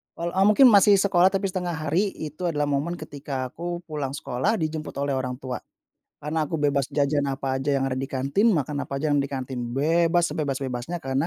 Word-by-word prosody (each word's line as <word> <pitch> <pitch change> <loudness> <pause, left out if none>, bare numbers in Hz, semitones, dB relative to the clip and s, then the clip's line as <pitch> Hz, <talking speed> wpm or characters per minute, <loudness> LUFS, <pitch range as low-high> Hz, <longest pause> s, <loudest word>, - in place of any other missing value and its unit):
kal 170 +1 -3
eee, 190 +1 +3
mungkin 250 +5 +7
masih 200 +1 +7
sekolah 185 -2 +4
tapi 195 +1 0
1/2 180 -3 -2
hari, 155 +5 +1 0.3
itu 155 +4 -9
adalah 150 -2 0
momen 165 +5 -1
ketika 145 -2 -8 0.2
aku 170 - -10 0.2
pulang 145 -3 -3
sekolah 130 - -1
dijemput 155 -2 -3
oleh 140 - -1
orang 125 -1 -3
tua. 130 -1 -4 0.6
Karena, 155 +2 -2
aku 165 - -6
bebas 145 -3 +1
jajan 145 0 +2
apa 135 -1 -2
aja 140 +2 0
yang 135 - +1
ada 130 0 -2
di 135 - -2
kantin, 140 - 0
makan 145 -2 -1
apa - - -6
aja 150 +2 -1
yang 145 - +3
di - - -2
kantin, 130 -2 -5 0.2
bebas, 165 +4 +2
sebebas-bebasnya. 135 +2 -3
Karena, 135 +3 0
145 Hz, 200 wpm, -25 LUFS, 135-170 Hz, 0.6 s, mungkin